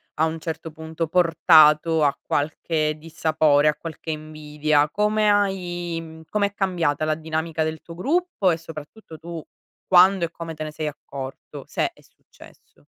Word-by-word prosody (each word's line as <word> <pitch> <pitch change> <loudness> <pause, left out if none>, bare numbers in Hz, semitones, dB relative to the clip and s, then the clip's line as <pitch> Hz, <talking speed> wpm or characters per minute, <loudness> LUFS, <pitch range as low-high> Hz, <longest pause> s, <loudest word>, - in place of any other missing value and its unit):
a 160 - +2
un 160 0 -3
certo 160 0 -5
punto, 160 +1 -5
portato 160 -2 +5
a 140 - +1
qualche 155 +1 -1
dissapore, 155 -2 +2
a 150 - +3
qualche 160 +1 -7
invidia. 150 -1 -1
Come 210 +4 +1
hai 175 -4 0
mhmm 160 0 -11
com'è 200 -1 0
cambiata 170 -7 0
la 155 0 +1
dinamica 160 0 -2
del 160 0 -4
tuo 170 - -11
gruppo 295 - 0
e 165 - +2
soprattutto 160 +2 -11
tu 165 -1 -7 0.4
quando 185 0 +5
e 165 - -1
come 165 -1 -7
te 155 - -6
ne 155 - -5
sei 155 0 -4
accorto 135 -2 -8
se - - -1
è - - -22
successo? - - -20
160 Hz, 155 wpm, -23 LUFS, 155-175 Hz, 0.4 s, portato